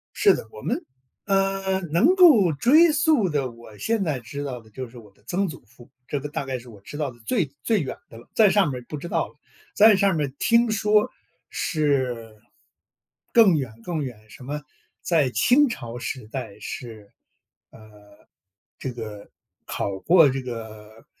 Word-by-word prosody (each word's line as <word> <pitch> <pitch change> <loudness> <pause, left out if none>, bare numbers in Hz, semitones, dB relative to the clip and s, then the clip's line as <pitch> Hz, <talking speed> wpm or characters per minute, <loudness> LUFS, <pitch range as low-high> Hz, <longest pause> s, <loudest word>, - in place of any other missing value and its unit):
是 - - +5
的， - - -5
我 105 - -11
们， - - -2 0.4
呃， 195 -1 +1
能 260 - +4
够 285 - +7
追 305 - +5
溯 290 - +3
的， 140 -4 -1
我 115 -2 -14
现 225 - 0
在 150 -7 -1
知 140 +5 -7
道 130 -3 -5
的 110 - -20
就 130 +2 -6
是 120 - -15
我 105 -4 -14
的 100 - -30
曾 195 +6 0
祖 160 - -8
父， 120 +2 -18 0.2
这 145 - -2
个 145 +2 -6
大 140 - -4
概 135 -1 -3
是 120 +1 -14
我 105 -4 -14
知 145 - -9
道 150 -2 -1
的 120 - -18
最 165 - 0
最 220 -6 +2
远 130 - -4
的 115 - -12
了， 120 - -15
再 215 -3 +6
上 195 -5 +3
面 125 - -4
儿 - - -19
不 150 - -5
知 145 - -7
道 - - -1
了。 - - -21 0.4
再 215 0 +7
上 195 -2 +2
面 150 -2 0
儿 135 - -12
听 235 0 +3
说 210 +2 +2 0.4
是， 130 -8 -1 1.0
更 215 -8 +6
远 130 -6 -3
更 160 0 -3
远， 110 -5 -9
什 125 - -13
么 145 +3 -5 0.4
在 155 -7 +2
清 265 - +4
朝 120 - -6
时 125 -2 -5
代 125 -4 -7
是， 110 -5 -8 0.6
呃， - - -15 1.0
这 130 - -5
个 110 -4 -8 0.4
考 100 -1 -3
过 165 - +6
这 135 +1 -2
个 110 -3 -9
140 Hz, 200 characters per minute, -24 LUFS, 120-195 Hz, 1.0 s, 够